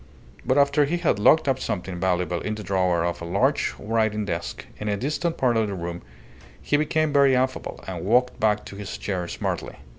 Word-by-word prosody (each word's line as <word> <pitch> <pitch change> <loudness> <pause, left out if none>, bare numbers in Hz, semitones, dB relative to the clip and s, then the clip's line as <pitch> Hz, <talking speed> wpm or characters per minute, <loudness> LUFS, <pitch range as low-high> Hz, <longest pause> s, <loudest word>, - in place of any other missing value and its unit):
But 130 +3 +1
after 140 +1 +4
he 165 +5 -1
had 165 -12 +1
locked 155 +9 +5
up 135 -1 +1
something 90 -5 -4
valuable 90 -1 0
in 105 - -3
the 105 - -7
drawer 90 -3 +1
of 85 0 -3
a - - -5
large 85 - +1
writing 110 -1 0
desk 85 -3 -4
in 105 - -3
a 100 - 0
distant 155 - -2
part 120 -3 +2
of 110 -1 +2
the 100 - -4
room, 85 -1 -5 0.6
he - - 0
became 155 0 +1
very 140 -2 +5
affable, 130 +1 -1
and 90 -3 -5
walked 125 +5 +2
back 105 -1 +1
to - - -9
his 100 -1 -6
chair 90 -4 -3
smartly. - - -4
105 Hz, 205 wpm, -24 LUFS, 90-135 Hz, 0.6 s, locked